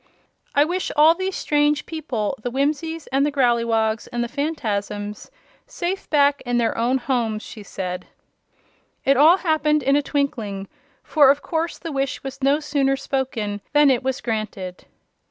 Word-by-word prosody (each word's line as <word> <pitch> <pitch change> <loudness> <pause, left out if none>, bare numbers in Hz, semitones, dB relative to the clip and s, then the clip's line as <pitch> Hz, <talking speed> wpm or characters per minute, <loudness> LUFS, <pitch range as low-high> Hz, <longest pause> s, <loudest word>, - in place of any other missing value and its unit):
"I 290 +1 +5
wish 360 +3 -2
all 310 +2 +7
these 375 +2 -3
strange 295 0 +1
people 275 -8 -3
the 245 - -3
Whimsies 300 +5 -1
and 270 +1 +2
the 295 - +1
Growleywogs 230 -4 +1
and 240 0 -1
the - - -2
Phanfasms 210 -8 -3 0.4
safe 385 -6 -4
back 285 -1 +3
in 245 -1 -1
their 235 -1 +1
own 240 +3 +1
homes!" 235 -4 -1
she 215 - -10
said. 180 -2 -5 1.0
It 275 - +5
all 310 +7 +7
happened 305 -4 +1
in 275 +2 +3
a 290 - +3
twinkling, 225 -10 -2 0.4
for 290 -4 +5
of 285 +1 +2
course 330 0 -2
the 330 - -6
wish 275 -1 -2
was 270 +1 -7
no 275 +2 +3
sooner 280 -3 +1
spoken 260 -7 -3
than 295 -1 +6
it 250 - +1
was 265 +1 -2
granted. 215 -5 -4
275 Hz, 160 wpm, -22 LUFS, 230-295 Hz, 1.0 s, all